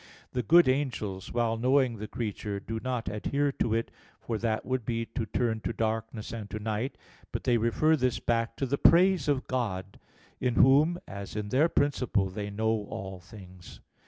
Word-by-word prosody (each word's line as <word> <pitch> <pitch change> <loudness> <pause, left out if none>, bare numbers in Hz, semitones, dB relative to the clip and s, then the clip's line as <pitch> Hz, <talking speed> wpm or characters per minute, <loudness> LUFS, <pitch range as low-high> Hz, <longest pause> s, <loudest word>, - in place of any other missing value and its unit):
The 125 - -1
good 170 +4 +6
angels, 120 -8 -1
while 115 -1 0
knowing 130 0 +2
the 105 +1 -6
creature, 105 -2 -4
do 110 +3 -5
not 125 -2 -2
adhere 140 +7 0
to 115 -4 0
it, 115 - -2 0.3
for 115 -2 -3
that 110 -1 -1
would 130 -1 -1
be 115 0 -2
to 115 -1 -4
turn 115 +1 0
to - - -3
darkness 110 -1 -3
and 110 -3 -6
to - - -4
night; 110 +4 -3 0.3
but - - -4
they 120 -2 +3
refer 135 +8 +3
this 130 -4 0
back 115 0 0
to 135 - -1
the 140 +2 -1
praise 180 -3 +5
of 140 -3 +1
God, 100 -7 -3 0.4
in 125 -2 0
Whom, 145 +6 +5
as 100 0 -7
in 105 -1 -3
their 145 +8 +3
principle, 125 - +1
they 100 +1 -4
know 110 0 -1
all 95 -1 -6
things. 90 -1 -13
115 Hz, 185 wpm, -29 LUFS, 105-130 Hz, 0.4 s, good